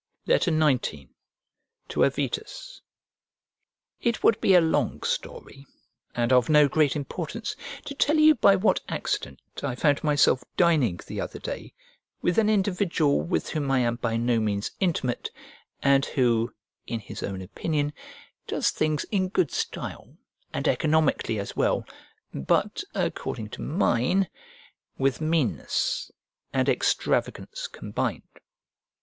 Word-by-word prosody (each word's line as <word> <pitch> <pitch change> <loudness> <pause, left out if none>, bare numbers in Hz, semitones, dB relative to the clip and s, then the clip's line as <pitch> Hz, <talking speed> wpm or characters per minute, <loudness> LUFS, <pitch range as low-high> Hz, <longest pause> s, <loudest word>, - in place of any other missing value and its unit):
XIX 155 - +3 1.1
To - - +2
AVITUS - - -2 1.2
IT 235 -2 0
would 225 - +4
be 190 - +5
a - - +9
long 165 -1 0
story, 135 0 -4 0.5
and 120 +1 +2
of 125 0 +4
no 150 -1 +6
great 145 -1 +2
importance, 145 -2 -4 0.3
to 280 - -5
tell 295 +2 +2
you 310 0 +7
by 200 -6 +5
what 195 +3 +2
accident 70 - -3 0.2
I 135 -3 -2
found 145 +2 +2
myself 145 -4 +3
dining 145 - +3
the - - -5
other - - -5
day - - -7 0.4
with 175 +4 +2
an 215 -1 +3
individual 190 -7 +2
with 175 - -2
whom 145 -3 -2
I 135 - +3
am 120 -1 0
by 115 -1 -1
no 120 0 +2
means 105 -2 -1
intimate, 160 -10 -1 0.5
and 140 0 +4
who, 120 -4 +1 0.4
in 115 - -2
his 105 - -8
own 95 -1 -4
opinion, 145 - -2 0.5
does - - +1
things 155 -1 0
in 190 -3 +1
good 360 - +1
style - - -5 0.3
and - - -2
economically 155 -7 +2
as 100 - -5
well, - - +1 0.5
but 70 - 0
according 105 -1 -3
to - - -8
mine, 170 - +1 0.7
with 135 +2 0
meanness 165 - 0 0.4
and - - +1
extravagance - - 0
combined. - - -3
150 Hz, 130 wpm, -26 LUFS, 120-185 Hz, 1.2 s, a